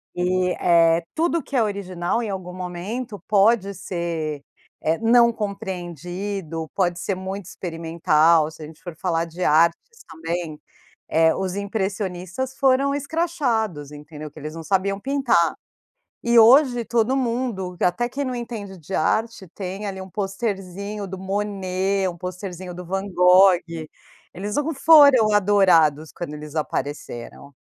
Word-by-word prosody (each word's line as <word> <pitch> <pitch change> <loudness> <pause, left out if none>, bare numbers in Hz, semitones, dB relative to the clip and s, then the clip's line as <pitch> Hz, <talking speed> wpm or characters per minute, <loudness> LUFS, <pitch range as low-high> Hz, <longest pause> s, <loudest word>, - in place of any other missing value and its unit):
E, 180 +1 +1
eh, 165 -1 +4
tudo 335 +1 +1
que 275 +1 -8
é 240 - +4
original, 190 -1 -2
em 225 - -4
algum 185 -2 -5
momento 190 +6 -5
pode 200 0 +3
ser, 170 -5 -4 0.4
eh, 160 +1 +1
não 235 +1 +5
compreendido. 180 -4 -5
Pode 175 -2 0
ser 195 - -2
muito 190 +1 -6
experimental, 165 -2 +2
se 160 - -14
a - - -6
gente 155 0 -15
for 175 -3 -8
falar 165 -1 -1
de 170 +2 -6
artes 165 +2 +4 0.3
também. 165 -1 -5 0.5
Eh, 160 0 +3
os 190 -1 -3
impressionistas 200 +3 -3
foram 275 +1 +3
escrachados, 260 - -1
entendeu. 150 0 -9
Que 155 - -12
eles 155 +1 -7
não 165 - -7
sabiam 195 +2 0
pintar. 255 - +2 0.7
E, 235 0 +4
hoje, 245 +1 +6
todo 235 +3 +1
mundo 230 -8 -2
q - - -1
até 230 +7 +1
quem 280 +3 -3
não 255 -1 -3
entende 220 -5 -6
de 170 +4 -8
arte, 220 +4 0
tem 195 +1 -5
ali 190 -1 -5
um 190 - -8
posterzinho 200 0 -4
do 190 0 -7
Monet, 195 -1 -1
um 175 - -6
posterzinho 180 0 -6
do 180 +1 -8
Van 195 +2 -2
Gogh. 180 +1 +6 0.8
Eles 205 +3 -5
não 295 +2 0
foram 280 -7 +6
adorados 180 -7 +4
quando 170 -4 -6
eles 150 0 -9
apareceram. 140 -2 -5
190 Hz, 145 wpm, -23 LUFS, 170-220 Hz, 0.8 s, hoje